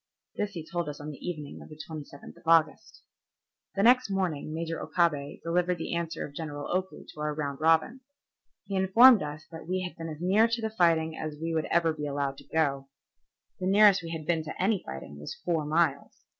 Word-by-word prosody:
This 205 Hz, -1 st, -2 dB
he 165 Hz, -3 st, -6 dB
told 175 Hz, -2 st, -3 dB
us 145 Hz, -, -7 dB
on 150 Hz, +1 st, -6 dB
the 140 Hz, -, -12 dB
evening 150 Hz, -4 st, -7 dB
of -, -, -12 dB
the 155 Hz, 0 st, -12 dB
27th 150 Hz, -3 st, -9 dB
of -, -, -19 dB
August. 165 Hz, -1 st, +2 dB, 0.7 s
The 195 Hz, -, +1 dB
next 250 Hz, 0 st, +5 dB
morning 180 Hz, -7 st, -2 dB
Major 165 Hz, +1 st, -4 dB
Okabe 150 Hz, -5 st, 0 dB
delivered 180 Hz, +1 st, +1 dB
the 165 Hz, -, -4 dB
answer 170 Hz, -1 st, -3 dB
of 140 Hz, -, -11 dB
General 145 Hz, +1 st, -4 dB
Oku 190 Hz, 0 st, -3 dB
to -, -, -14 dB
our 150 Hz, 0 st, -2 dB
round 145 Hz, -2 st, -4 dB
robin. 165 Hz, +11 st, +3 dB, 0.6 s
He 200 Hz, -, -4 dB
informed 220 Hz, +5 st, +7 dB
us 150 Hz, +1 st, -6 dB
that 160 Hz, 0 st, -9 dB
we 185 Hz, +1 st, -1 dB
had 180 Hz, -, -6 dB
been 165 Hz, 0 st, -6 dB
as 155 Hz, -, -6 dB
near 195 Hz, +6 st, +4 dB
to 230 Hz, +1 st, -1 dB
the 220 Hz, -1 st, -3 dB
fighting 165 Hz, -5 st, +2 dB
as 155 Hz, -1 st, -5 dB
we 165 Hz, +1 st, -2 dB
ever 170 Hz, -1 st, +3 dB
would 155 Hz, -, -3 dB
be 150 Hz, 0 st, -3 dB
allowed 140 Hz, -1 st, -2 dB
to -, -, -16 dB
go. 140 Hz, -4 st, 0 dB, 0.7 s
The 185 Hz, -, -2 dB
nearest 200 Hz, 0 st, +6 dB
we 165 Hz, -, -7 dB
had 160 Hz, -2 st, -5 dB
been 165 Hz, -1 st, 0 dB
to 155 Hz, -, -7 dB
any 195 Hz, +1 st, +1 dB
fighting 70 Hz, +2 st, -8 dB
was 75 Hz, -, -7 dB
four 165 Hz, -4 st, -1 dB
miles. 150 Hz, -2 st, 0 dB
165 Hz, 210 wpm, -28 LUFS, 150-185 Hz, 0.7 s, informed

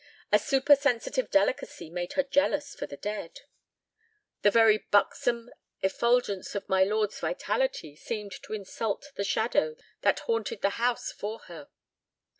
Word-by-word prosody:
A 210 Hz, -, +6 dB
supersensitive 275 Hz, -, +2 dB
delicacy 260 Hz, -, 0 dB
made 175 Hz, 0 st, -4 dB
her 280 Hz, -, +2 dB
jealous 285 Hz, +1 st, +1 dB
for -, -, -6 dB
the 140 Hz, -, -9 dB
dead. 210 Hz, -3 st, -5 dB, 1.0 s
The 205 Hz, -, +6 dB
very 220 Hz, 0 st, +5 dB
buxom 235 Hz, +4 st, +1 dB, 0.3 s
effulgence 205 Hz, -1 st, +1 dB
of 200 Hz, -, -4 dB
my 190 Hz, 0 st, +4 dB
lord's 210 Hz, +1 st, 0 dB
vitality -, -, -1 dB
seemed 210 Hz, +4 st, -5 dB
to -, -, -8 dB
insult 215 Hz, +6 st, -4 dB
the 200 Hz, -, -3 dB
shadow 220 Hz, -, +1 dB, 0.3 s
that -, -, +2 dB
haunted 460 Hz, 0 st, -2 dB
the -, -, +4 dB
house 245 Hz, 0 st, +1 dB
for 215 Hz, +2 st, -5 dB
her. 165 Hz, -5 st, -11 dB
220 Hz, 135 wpm, -28 LUFS, 200-275 Hz, 1.0 s, A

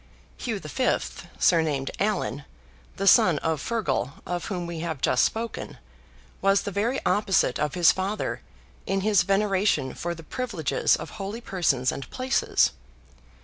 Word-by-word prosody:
HUGH 230 Hz, -4 st, -2 dB
V. 205 Hz, -, +1 dB, 0.4 s
(surnamed 155 Hz, -6 st, +2 dB
Allan), 195 Hz, -8 st, -1 dB, 0.5 s
the 195 Hz, -, -3 dB
son 180 Hz, -4 st, +6 dB
of 160 Hz, 0 st, -1 dB
FEARGAL, 145 Hz, -, -1 dB
of 175 Hz, +1 st, -3 dB
whom 180 Hz, -3 st, -3 dB
we 170 Hz, -1 st, -5 dB
have 160 Hz, -3 st, -3 dB
just 155 Hz, -, +3 dB
spoken, 230 Hz, +1 st, -3 dB, 0.6 s
was 195 Hz, 0 st, +3 dB
the 200 Hz, -, -4 dB
very 225 Hz, +7 st, 0 dB
opposite 185 Hz, -7 st, +2 dB
of 150 Hz, -2 st, -1 dB
his 175 Hz, -2 st, +6 dB
father, 195 Hz, +3 st, -3 dB, 0.5 s
in 195 Hz, 0 st, 0 dB
his 205 Hz, -2 st, +4 dB
veneration 195 Hz, -7 st, +1 dB
for 175 Hz, 0 st, -4 dB
the 165 Hz, -, -11 dB
privileges 205 Hz, -, 0 dB
of -, -, -7 dB
holy 210 Hz, +1 st, -5 dB
persons 155 Hz, -, +1 dB
and 135 Hz, -, -7 dB
places. 260 Hz, +1 st, +1 dB
185 Hz, 145 wpm, -26 LUFS, 160-210 Hz, 0.6 s, son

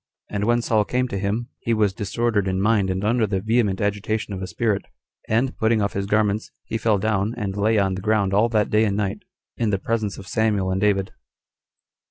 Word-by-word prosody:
And 105 Hz, 0 st, -1 dB
when 120 Hz, +1 st, +2 dB
Saul 110 Hz, -2 st, +2 dB
came 125 Hz, +4 st, 0 dB
to 100 Hz, -, -3 dB
him, 105 Hz, +5 st, -2 dB
he 115 Hz, -, 0 dB
was 105 Hz, -3 st, +2 dB
disordered 105 Hz, +1 st, 0 dB
in 95 Hz, 0 st, 0 dB
mind 105 Hz, -1 st, +2 dB
19 -, -, -1 dB
and 95 Hz, +1 st, -2 dB
under 115 Hz, -1 st, +2 dB
the 95 Hz, -1 st, -1 dB
vehement 110 Hz, -2 st, +1 dB
agitation 105 Hz, +1 st, -1 dB
of 95 Hz, -, -5 dB
a 95 Hz, -, -4 dB
spirit; 105 Hz, -1 st, 0 dB, 0.5 s
and, 120 Hz, +4 st, +1 dB
putting 110 Hz, 0 st, +2 dB
off 100 Hz, -1 st, 0 dB
his 100 Hz, 0 st, -2 dB
garments, 105 Hz, 0 st, +1 dB, 0.2 s
20 -, -, -8 dB
he -, -, +2 dB
fell 110 Hz, -1 st, +2 dB
down, 105 Hz, +2 st, 0 dB
and 100 Hz, -4 st, -3 dB
lay 110 Hz, +2 st, +2 dB
on 95 Hz, -2 st, +2 dB
the 95 Hz, -, -4 dB
ground 105 Hz, -2 st, +1 dB
all 110 Hz, +4 st, +3 dB
that 110 Hz, -2 st, +1 dB
day 110 Hz, +1 st, +4 dB
and 100 Hz, -1 st, 0 dB
night, 105 Hz, 0 st, -1 dB, 0.4 s
in 115 Hz, -2 st, +1 dB
the 100 Hz, -, +1 dB
presence 110 Hz, 0 st, -2 dB
of 95 Hz, -, -9 dB
Samuel 105 Hz, -4 st, +1 dB
and 95 Hz, +1 st, -1 dB
David. 100 Hz, -2 st, +1 dB
105 Hz, 230 wpm, -23 LUFS, 100-110 Hz, 0.5 s, day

